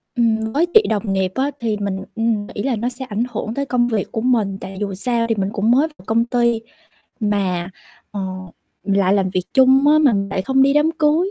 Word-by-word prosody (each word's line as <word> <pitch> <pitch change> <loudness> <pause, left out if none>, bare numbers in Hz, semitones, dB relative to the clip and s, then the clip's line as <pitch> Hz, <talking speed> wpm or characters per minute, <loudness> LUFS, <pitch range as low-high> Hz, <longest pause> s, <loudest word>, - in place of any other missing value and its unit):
Ừm, 220 -2 +1
với 315 +4 +3
chị 440 - +8
đồng 205 -2 -1
nghiệp 190 -1 0
á 275 +2 0
thì 225 -3 -1
mình, 200 -2 -2 0.2
ừm, 225 -2 -1
nghĩ 205 - -6
là 265 -1 0
nó 235 +3 -2
sẽ 260 +1 -8
ảnh 220 -1 -2
hưởng 220 0 -4
tới 280 +3 -2
công 250 -2 +1
việc 220 -5 -2
của 220 - -3
mình, 220 -6 +1
tại 190 0 -8
dù 205 -2 -3
sao 230 +4 -1
thì 225 - +2
mình 195 -2 -1
cũng 215 +2 +1
mới 275 +6 +4
vào 180 - -18
công 230 +2 +1
ty 235 -1 +1 0.6
mà, 195 -5 -1 0.4
ờ, 205 - -5 0.6
lại 195 -1 +2
làm 195 -2 +1
việc 185 0 -1
chung 265 +1 +5
á, 305 +1 +6
mà 290 -5 +4
mình 195 -1 -1
lại 190 -1 -2
không 265 +4 +2
đi 275 +1 +4
đám 295 +2 +3
cưới, 315 +5 +2
225 Hz, 235 wpm, -19 LUFS, 200-260 Hz, 0.6 s, chị